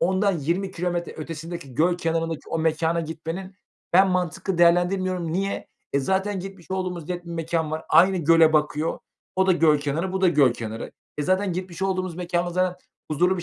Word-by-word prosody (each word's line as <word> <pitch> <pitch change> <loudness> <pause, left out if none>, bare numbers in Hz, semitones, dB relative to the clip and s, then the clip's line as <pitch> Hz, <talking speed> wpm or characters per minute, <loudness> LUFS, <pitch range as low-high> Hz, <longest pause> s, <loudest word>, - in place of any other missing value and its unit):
ondan 190 0 +2
20 175 +7 -1
kilometre 175 -1 -2
ötesindeki 160 -3 -7
göl 175 +5 +3
kenarındaki 165 -1 -2
o 165 - -1
mekâna 160 +1 +1
gitmenin 165 +4 -6 0.4
ben 190 +2 +6
mantıklı 185 0 -1
değerlendirmiyorum. 175 0 +2
Niye? 195 +3 -2 0.2
E, 140 - +3
zaten 190 +5 0
gitmiş 190 -2 -10
olduğumuz 185 -4 -3
net 175 -1 -4
bir 170 - -9
mekân 165 -1 -1
var. 155 0 -4
Aynı 185 +2 +6
göle 165 0 +5
bakıyor. 150 +1 +1 0.4
O 190 0 +3
da 185 - +5
göl 155 -3 +4
kenarı, 155 +6 -2
bu 190 - -1
da 185 - +5
göl 140 -7 +4
kenarı. 115 -1 -6 0.3
E, - - +1
zaten 185 +2 +1
gitmiş 180 0 -5
olduğumuz 185 -2 -1
mekânda 175 0 -1
zaten 180 +1 0 0.3
huzurlu 180 +5 +2
bir 175 - -4
175 Hz, 180 wpm, -24 LUFS, 160-185 Hz, 0.4 s, ben